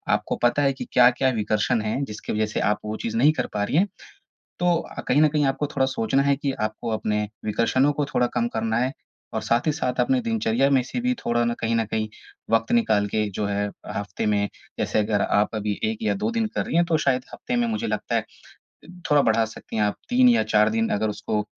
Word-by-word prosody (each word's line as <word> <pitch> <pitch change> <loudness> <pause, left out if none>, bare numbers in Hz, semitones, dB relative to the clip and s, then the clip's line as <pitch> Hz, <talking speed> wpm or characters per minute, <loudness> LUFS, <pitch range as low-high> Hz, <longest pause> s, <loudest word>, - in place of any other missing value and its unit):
आपको - - -3
पता 120 +4 +3
है 135 -1 +2
कि - - -7
क्या-क्या 125 +1 +5
विकर्षण 110 +3 +1
हैं 110 +6 -2
जिसकी 105 - -6
वज़ह 110 +1 +1
से - - 0
आप 105 - -1
वो 105 - -3
चीज़ 230 0 -3
नहीं 155 -9 +5
कर - - -4
पा 105 -1 0
रही 135 - 0
हैं। 195 +4 +4 0.7
तो 175 -1 +3 0.3
कहीं 140 - +4
न 155 - +6
कहीं 150 0 +1
आपको 135 +2 0
थोड़ा 140 -2 0
सोचना 135 +1 +1
है 140 0 +3
कि 140 -1 -2
आपको 110 +2 -7
अपने 105 -1 -1 0.2
विकर्षणों 130 +6 +2
को 145 0 -1
थोड़ा 125 - +3
कम 120 - +2
करना 110 0 0
है 130 +2 0 0.4
और - - -1
साथ 115 +4 +1
ही 155 - +3
साथ 130 -5 -2
अपने 265 -1 +2
दिनचर्या 175 - +1
में 135 -2 +4
से 140 - -4
भी 250 +1 +1
थोड़ा 120 0 +1
ना, 120 0 0
कहीं 115 0 -2
न 115 - +1
कहीं 110 0 -2 0.4
वक्त 115 0 +2
निकाल 215 - +3
के 105 +1 0
जो 105 - 0
है 100 0 -1 0.3
हफ़्ते 100 0 -3
में 100 -1 +1 0.3
जैसे - - 0
अगर 105 -1 +1
आप 105 +2 +1
अभी 105 -1 -2
1 220 0 -1
या 220 - +1
2 220 - +1
दिन 230 -1 0
कर - - 0
रही - - -1
हैं 170 - +5
तो 165 - +2
शायद 130 -1 +1
हफ़्ते 250 - -3
में 240 0 +2
मुझे 230 +1 -2
लगता - - -2
है - - 0 0.9
थोड़ा 145 -1 +5
बढ़ा 115 -1 +3
सकती 110 0 -8
हैं। 110 - +2
आप, 105 - 0
3 250 0 +5
या 240 -1 +4
4 105 0 +3
दिन 115 +1 0
अगर 110 - 0
उसको 105 0 -2
120 Hz, 235 wpm, -24 LUFS, 110-150 Hz, 0.9 s, न